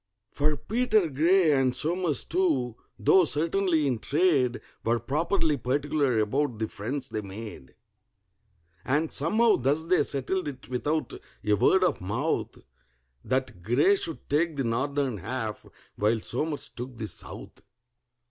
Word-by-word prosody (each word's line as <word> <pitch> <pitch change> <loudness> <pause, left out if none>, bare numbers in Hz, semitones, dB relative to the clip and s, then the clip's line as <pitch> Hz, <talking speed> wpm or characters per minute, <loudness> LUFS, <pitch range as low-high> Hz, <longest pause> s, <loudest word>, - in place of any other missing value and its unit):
For 150 +1 0
PETER 220 - +1
GRAY, 165 +4 +4
and 135 -3 +2
SOMERS 160 +1 0
too, 150 -10 0 0.2
though 180 - +5
certainly 165 +1 +1
in 125 -5 0
trade, 140 -4 +2 0.2
Were 115 +1 +1
properly 155 - 0
particular 140 -1 0
about 125 +3 0
the 110 0 -1
friends 130 +7 -5
they 110 - -3
made; 100 - -9 1.1
And 150 +4 0
somehow 215 +10 +3
thus 140 +5 +1
they 180 +1 +3
settled 145 +6 -1
it 130 -6 -7
without 145 +5 -1 0.3
a 105 - +3
word 185 - +4
of 180 - +1
mouth— 120 - -2 0.6
That 130 -7 -2
GRAY 125 - +4
should 165 -5 -4
take 155 +1 +1
the 135 - 0
northern 130 +1 -1
half, 110 +2 -4 0.3
while 110 +2 +2
SOMERS 145 +7 -3
took 125 0 -8
the 110 -1 -4
south. - - -10
140 Hz, 135 wpm, -27 LUFS, 120-160 Hz, 1.1 s, though